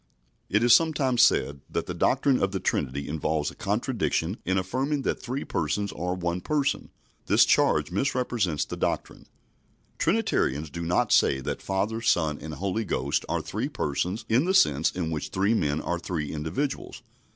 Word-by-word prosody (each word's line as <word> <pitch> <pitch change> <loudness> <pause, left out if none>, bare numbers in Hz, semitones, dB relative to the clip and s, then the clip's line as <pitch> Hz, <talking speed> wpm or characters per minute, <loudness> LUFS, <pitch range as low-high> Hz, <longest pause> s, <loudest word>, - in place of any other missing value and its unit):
It 105 +4 +2
is 120 -1 +6
sometimes 135 -7 +2
said 70 -10 +3
that - - -2
the - - -4
doctrine 135 -3 +2
of 95 - +1
the 95 - -1
Trinity 70 -4 -2
involves 75 0 -1
a - - -15
contradiction 85 +7 -1
in 95 +1 +1
affirming 135 +10 -1
that - - -1
three 130 +3 -3
Persons 100 +6 -1
are 90 +1 -3
one 85 0 -2
Person. 145 +2 -1 0.4
This - - +6
charge - - +2
misrepresents 105 - 0
the - - -6
doctrine. - - -3 0.7
Trinitarians 75 +3 0
do 85 - -5
not 85 +1 +1
say 65 - +4
that - - -4
Father, 100 +4 -1
Son, 80 -10 +1
and 80 0 -6
Holy 100 +5 -2
Ghost 70 -6 -1
are - - -1
three - - -3
Persons 90 +10 -2
in 120 +7 +3
the 190 +1 +1
sense 75 - +4
in 85 -3 -3
which 75 -2 -3
three 100 +4 +1
men 75 -8 0
are 85 0 -2
three 80 -4 -3
individuals. 80 - -3
95 Hz, 170 wpm, -26 LUFS, 80-120 Hz, 0.7 s, is